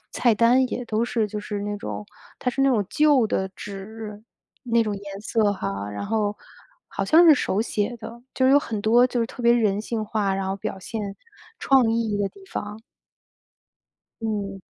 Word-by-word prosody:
菜 235 Hz, -3 st, +3 dB
单 245 Hz, +4 st, +4 dB
也 245 Hz, 0 st, -4 dB
都 225 Hz, 0 st, 0 dB
是 230 Hz, -2 st, 0 dB
就 210 Hz, +1 st, -4 dB
是 205 Hz, -1 st, -4 dB
那 205 Hz, 0 st, -3 dB
种 205 Hz, -, -6 dB, 0.3 s
它 250 Hz, -, -1 dB
是 270 Hz, -, -3 dB
那 275 Hz, -, +4 dB
种 215 Hz, -5 st, +2 dB
旧 295 Hz, -6 st, +4 dB
的 190 Hz, -2 st, -1 dB
纸， 210 Hz, +1 st, -8 dB, 0.4 s
那 235 Hz, -1 st, +3 dB
种 210 Hz, -2 st, -2 dB
颜 200 Hz, 0 st, -8 dB
色 215 Hz, -1 st, +1 dB
哈， 100 Hz, -, -4 dB
然 105 Hz, -, -5 dB
后 210 Hz, -1 st, 0 dB, 0.5 s
好 -, -, -3 dB
像 335 Hz, +2 st, +6 dB
是 315 Hz, -, +9 dB
手 210 Hz, -5 st, 0 dB
写 225 Hz, +1 st, -2 dB
的。 235 Hz, +2 st, -9 dB
就 260 Hz, -, +2 dB
是 265 Hz, -, +5 dB
有 285 Hz, -, +7 dB
很 220 Hz, -7 st, -4 dB
多 235 Hz, +3 st, +5 dB
就 250 Hz, -, -3 dB
是 230 Hz, -, +1 dB
特 245 Hz, -, -9 dB
别 235 Hz, 0 st, +6 dB
人 210 Hz, -4 st, +2 dB
性 220 Hz, 0 st, -3 dB
化， 210 Hz, -2 st, 0 dB
然 195 Hz, 0 st, -2 dB
后 195 Hz, -, -1 dB
表 195 Hz, -, -5 dB
现 215 Hz, +4 st, -5 dB, 0.6 s
创 260 Hz, -4 st, +4 dB
意 225 Hz, -2 st, 0 dB
的 200 Hz, -1 st, 0 dB
地 395 Hz, -, -17 dB
方。 210 Hz, +1 st, -5 dB, 1.4 s
嗯。 200 Hz, -3 st, -3 dB
220 Hz, 210 characters per minute, -24 LUFS, 205-240 Hz, 1.4 s, 是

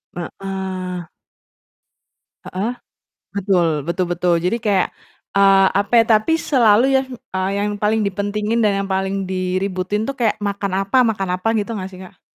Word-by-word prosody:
Heeh. 185 Hz, 0 st, -5 dB, 1.4 s
Heeh, 200 Hz, +6 st, -3 dB, 0.6 s
betul 190 Hz, -3 st, +2 dB, 0.2 s
betul 175 Hz, +1 st, -1 dB
betul, 175 Hz, 0 st, +1 dB
jadi 200 Hz, +6 st, +1 dB
kayak, 200 Hz, -4 st, +2 dB, 0.5 s
eee, 195 Hz, -1 st, +6 dB
apa 205 Hz, +3 st, -5 dB
ya -, -, -3 dB
tapi 215 Hz, +10 st, -2 dB
selalu 240 Hz, -7 st, +4 dB
yang, 265 Hz, 0 st, 0 dB, 0.3 s
eee, 185 Hz, +1 st, 0 dB
yang 205 Hz, -, 0 dB
paling 215 Hz, +1 st, +2 dB
dipentingin 205 Hz, +3 st, -1 dB
dan 210 Hz, -2 st, +3 dB
yang -, -, -7 dB
paling 190 Hz, 0 st, -1 dB
diributin 185 Hz, +2 st, -1 dB
tuh 275 Hz, -, -2 dB
kayak 230 Hz, -4 st, +1 dB
makan 200 Hz, -1 st, -2 dB
apa 195 Hz, -, -1 dB
makan 195 Hz, -4 st, -1 dB
apa 205 Hz, +5 st, -2 dB
gitu 210 Hz, +2 st, -2 dB
ga 185 Hz, -, -5 dB
sih, 185 Hz, -1 st, -13 dB
Kak? 185 Hz, -, -14 dB
195 Hz, 150 wpm, -20 LUFS, 185-210 Hz, 1.4 s, eee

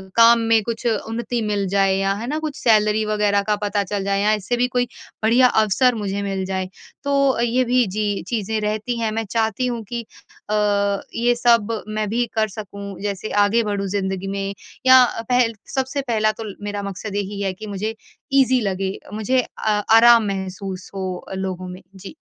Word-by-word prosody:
काम 230 Hz, 0 st, +7 dB
में 225 Hz, -1 st, +3 dB
कुछ 230 Hz, +2 st, -5 dB
उन्नति 230 Hz, +2 st, -2 dB
मिल 205 Hz, -2 st, -1 dB
जाए 195 Hz, 0 st, +2 dB
या 195 Hz, 0 st, +1 dB
है 215 Hz, +4 st, -5 dB
ना? 300 Hz, +4 st, -2 dB
कुछ 310 Hz, -2 st, -4 dB
सैलरी 215 Hz, -1 st, +4 dB
वग़ैरह 210 Hz, -1 st, +1 dB
का 210 Hz, -, +3 dB
पता 205 Hz, 0 st, -1 dB
चल 200 Hz, 0 st, -3 dB
जाए 195 Hz, 0 st, 0 dB
या 210 Hz, +1 st, +3 dB
इससे 215 Hz, +3 st, -1 dB
भी 245 Hz, +1 st, +2 dB
कोई 245 Hz, -1 st, 0 dB, 0.4 s
बढ़िया 240 Hz, +3 st, +5 dB
अवसर 235 Hz, +3 st, +3 dB
मुझे 200 Hz, -2 st, -3 dB
मिल 195 Hz, -1 st, -2 dB
जाए। 190 Hz, -1 st, -3 dB, 0.3 s
तो 275 Hz, -3 st, +2 dB
ये 240 Hz, +2 st, +2 dB
भी 250 Hz, 0 st, +3 dB
जी 205 Hz, +1 st, -2 dB
चीज़ें 220 Hz, -1 st, -1 dB
रहती 215 Hz, +3 st, -2 dB
हैं 225 Hz, -1 st, 0 dB
मैं 225 Hz, +1 st, -2 dB
चाहती 225 Hz, +2 st, 0 dB
हूँ 235 Hz, -2 st, -3 dB
कि 240 Hz, -1 st, -3 dB, 0.5 s
अ, 215 Hz, -, +1 dB, 0.6 s
ये 240 Hz, +1 st, +2 dB
सब 230 Hz, -2 st, +2 dB
मैं 215 Hz, 0 st, -2 dB
भी 240 Hz, +3 st, +1 dB
कर 220 Hz, -1 st, +2 dB
सकूँ 200 Hz, -1 st, -8 dB
जैसे 200 Hz, 0 st, -3 dB, 0.2 s
आगे 230 Hz, +3 st, +2 dB
बढ़ूँ 200 Hz, -2 st, -2 dB
ज़िंदगी 190 Hz, -1 st, -2 dB
में, 195 Hz, 0 st, -3 dB, 0.3 s
या 260 Hz, 0 st, +8 dB, 0.3 s
पहल 245 Hz, -2 st, +3 dB, 0.2 s
सबसे 265 Hz, +1 st, -1 dB
पहला 215 Hz, -2 st, +2 dB
तो 225 Hz, -, -8 dB, 0.2 s
मेरा 205 Hz, 0 st, -3 dB
मकसद 200 Hz, +1 st, -6 dB
यही 200 Hz, 0 st, -3 dB
है 195 Hz, -1 st, -1 dB
कि 215 Hz, +4 st, -9 dB
मुझे 210 Hz, +2 st, -3 dB, 0.4 s
इज़ी 260 Hz, -2 st, +4 dB
लगे 195 Hz, -1 st, -2 dB, 0.2 s
मुझे 245 Hz, +4 st, +1 dB
आ 210 Hz, -1 st, +1 dB, 0.2 s
आराम 235 Hz, 0 st, +7 dB
महसूस 190 Hz, -1 st, -5 dB
हो 190 Hz, -1 st, -3 dB
अ, -, -, -6 dB
लोगों 185 Hz, -1 st, -4 dB
में। 180 Hz, +1 st, -9 dB
जी। 190 Hz, +7 st, -10 dB
215 Hz, 190 wpm, -21 LUFS, 200-235 Hz, 0.6 s, या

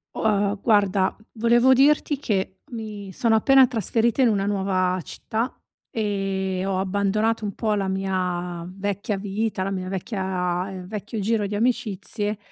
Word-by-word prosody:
U -, -, -5 dB
ehm, 210 Hz, -2 st, +3 dB
ehm, 200 Hz, 0 st, -4 dB
guarda, 200 Hz, -4 st, +3 dB, 0.2 s
volevo 235 Hz, +3 st, +4 dB
dirti 285 Hz, +2 st, +3 dB
che 190 Hz, -6 st, -2 dB
mi 210 Hz, -4 st, -6 dB
sono 230 Hz, -1 st, +2 dB
appena 265 Hz, +4 st, +6 dB
trasferita 230 Hz, +2 st, +1 dB
in 255 Hz, -, +6 dB
una 200 Hz, -2 st, +1 dB
nuova 190 Hz, -2 st, +1 dB
città, 225 Hz, +9 st, -3 dB, 0.4 s
ehm, 195 Hz, -3 st, -1 dB
ho 195 Hz, -1 st, 0 dB
abbandonato 205 Hz, +3 st, 0 dB
un 200 Hz, -, -3 dB
po' 220 Hz, -2 st, 0 dB
la 200 Hz, -2 st, 0 dB
mia 180 Hz, -2 st, -2 dB
vecchia 200 Hz, +2 st, -3 dB
vita 205 Hz, 0 st, -2 dB
la 195 Hz, -, -2 dB
mia 185 Hz, -1 st, -3 dB
vecchia, 190 Hz, -2 st, -2 dB
ehm, 185 Hz, -1 st, -7 dB
vecchio 210 Hz, +2 st, -5 dB
giro 210 Hz, 0 st, +1 dB
di 205 Hz, -, -4 dB
amicizie, 210 Hz, -2 st, -1 dB
200 Hz, 155 wpm, -24 LUFS, 190-220 Hz, 0.4 s, appena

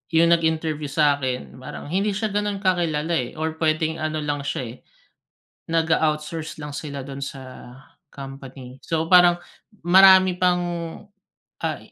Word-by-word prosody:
yung 165 Hz, +1 st, +5 dB
nag-interview 160 Hz, -2 st, +1 dB
sa'kin, 140 Hz, -4 st, 0 dB
parang, 130 Hz, +3 st, -8 dB
hindi 200 Hz, +2 st, 0 dB
siya 215 Hz, +1 st, -2 dB
ganun 205 Hz, 0 st, -2 dB
kakilala 170 Hz, -4 st, 0 dB
eh, 130 Hz, -7 st, -1 dB
or 160 Hz, 0 st, -4 dB
pwedeng 160 Hz, 0 st, 0 dB
ano 155 Hz, -1 st, -2 dB
lang 145 Hz, -1 st, -3 dB
siya, 135 Hz, -, -2 dB
eh, 120 Hz, 0 st, -7 dB, 1.0 s
nag-a 160 Hz, -1 st, +2 dB
outsource 155 Hz, +1 st, -7 dB
lang 145 Hz, -1 st, -6 dB
sila 145 Hz, -2 st, -6 dB
dun 135 Hz, +1 st, -6 dB
sa 135 Hz, 0 st, -7 dB, 0.7 s
company. 135 Hz, -2 st, -10 dB
So 165 Hz, 0 st, -1 dB
parang, 175 Hz, -1 st, +6 dB, 0.5 s
marami 190 Hz, 0 st, +7 dB
pang, 180 Hz, -1 st, +2 dB, 1.0 s
ah -, -, -2 dB
155 Hz, 135 wpm, -23 LUFS, 140-175 Hz, 1.0 s, marami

